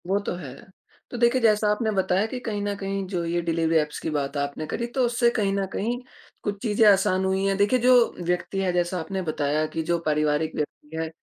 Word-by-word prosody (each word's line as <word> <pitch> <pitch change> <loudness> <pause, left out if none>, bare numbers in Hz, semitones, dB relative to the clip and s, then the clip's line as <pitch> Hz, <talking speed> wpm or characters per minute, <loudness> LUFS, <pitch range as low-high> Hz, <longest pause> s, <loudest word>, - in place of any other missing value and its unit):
वो 195 +2 +2
तो 200 - -3
है। 145 -8 -8 0.6
तो 245 - -5
देखिए, 240 +2 +3
जैसा 215 -2 +3
आपने 220 +1 0
बताया 190 0 +1
कि 250 +3 -5
कहीं 215 -4 -3
न 205 0 -1
कहीं 195 0 -3
जो 180 -3 -2
ये 170 +1 0
डिलिवरी 165 -1 0
ऐप्स 150 -1 -1
की - - -3
बात 145 -1 -2
आपने 145 +2 -3
करी, 235 +9 -3
तो 250 +1 0
उससे 240 0 +2
कहीं 210 -4 0
न 195 0 0
कहीं 235 +4 -1 0.4
कुछ 205 -1 -3
चीज़ें 220 -1 +2
आसान 190 -1 +2
हुई 190 0 0
है। 195 0 +2
देखिए, 205 +6 +3
जो 245 -1 +4
व्यक्ति 180 +2 -1
है 185 -1 +1
जैसा 175 +1 0
आपने 190 +4 -3
बताया 155 -2 0
कि 160 - -2
जो 170 - +3
पारिवारिक 150 0 +1
व्यक्ति 150 +1 -5
है, 160 - -3
190 Hz, 225 wpm, -25 LUFS, 160-215 Hz, 0.6 s, जो